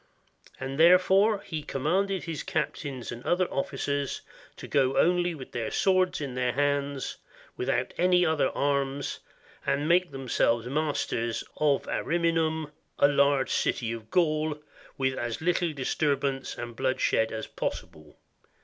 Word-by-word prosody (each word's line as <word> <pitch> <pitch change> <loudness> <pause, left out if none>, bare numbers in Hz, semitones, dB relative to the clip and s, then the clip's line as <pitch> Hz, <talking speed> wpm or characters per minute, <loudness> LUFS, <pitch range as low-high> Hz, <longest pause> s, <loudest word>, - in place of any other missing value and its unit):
And 135 +2 -5
therefore, 190 +5 +5
he 160 -3 -4
commanded 180 +7 0
his 165 -3 -4
captains 135 -5 -3
and 120 +1 -8
other 180 +1 +2
officers 140 0 -2 0.4
to - - -8
go 135 -2 +2
only 175 0 +3
with 130 -4 -10
their 115 -2 -3
swords 185 -1 +2
in 140 -4 -4
their 125 -1 0
hands, 140 -1 -1 0.4
without 125 0 -1
any 180 0 +4
other 160 -4 +2
arms, 140 0 -1 0.4
and 145 +2 0
make 175 +1 +3
themselves 125 -3 0
masters 130 -5 -1
of 145 -2 +2
Ariminum, 160 -2 0 0.3
a - - +6
large 140 -1 +2
city 115 -2 0
of 110 -1 -7
Gaul, 155 -3 +1 0.4
with 130 -1 0
as 120 -1 -3
little 175 0 +1
disturbance 140 -1 -1
and 120 -1 -6
blood 130 +3 0
shed 110 0 +2
as 110 0 -4
possible. 75 -1 -6
145 Hz, 135 wpm, -28 LUFS, 130-165 Hz, 0.4 s, a